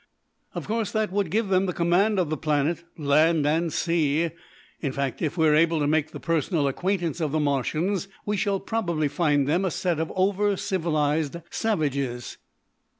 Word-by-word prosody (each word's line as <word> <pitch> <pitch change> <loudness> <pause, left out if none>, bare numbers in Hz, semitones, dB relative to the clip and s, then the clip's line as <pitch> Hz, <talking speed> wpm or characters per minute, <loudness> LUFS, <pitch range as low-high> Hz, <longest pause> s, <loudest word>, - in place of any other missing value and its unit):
Of - - -4
course 225 0 -1
that 220 -3 0
would 200 -3 0
give 210 +3 0
them 190 0 +2
the 180 - -1
command 180 +6 +2
of 175 -5 0
the - - +1
planet, 155 +2 0
land 155 +1 +3
and 160 +2 +1
sea. 165 -1 +1 0.5
In 140 - -2
fact, 135 -1 -3
if 160 +2 -2
we 160 -1 +4
are 150 - +4
able 165 +2 +3
to 145 - +1
make 155 +1 +1
the - - -8
personal 165 -2 0
acquaintance 175 +3 -1
of 155 -3 0
the 155 - +1
Martians, 155 +7 0 0.2
we 210 - 0
shall 195 0 0
probably 170 -9 -1
find 145 -2 +1
them 170 +6 +2
a 190 - +1
set 175 -1 -1
of 160 - -2
over 200 +1 +1
civilised 160 -6 0 0.2
savages." 140 - -2
165 Hz, 180 wpm, -25 LUFS, 150-190 Hz, 0.5 s, we